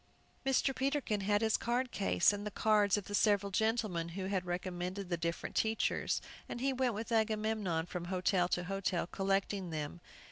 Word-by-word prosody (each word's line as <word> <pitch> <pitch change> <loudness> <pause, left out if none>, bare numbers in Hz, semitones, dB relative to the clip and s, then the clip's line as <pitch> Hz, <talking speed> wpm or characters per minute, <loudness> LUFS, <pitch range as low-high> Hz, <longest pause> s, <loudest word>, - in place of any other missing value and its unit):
Mr. 270 0 +2
Peterkin 270 -6 0
had 205 +2 +2
his 220 -1 +3
card 245 +2 -1
case, 195 -1 +3
and 205 0 -4
the 210 - -3
cards 210 -2 +3
of 205 - -4
the 205 - -7
several 205 -1 +3
gentlemen 215 -5 0
who 185 +3 -4
had 190 -2 -1
recommended 180 +1 -3
the 175 - +1
different 170 0 -3
teachers, 220 0 +1 0.3
and - - -4
he 270 +2 +1
went 255 -3 0
with 225 +3 -5
Agamemnon 215 -6 +1
from 175 0 -5
hotel 180 0 +1
to 175 0 0
hotel 195 -1 -1
collecting 195 0 -1
them. 155 +1 -4
200 Hz, 175 wpm, -34 LUFS, 180-220 Hz, 0.3 s, his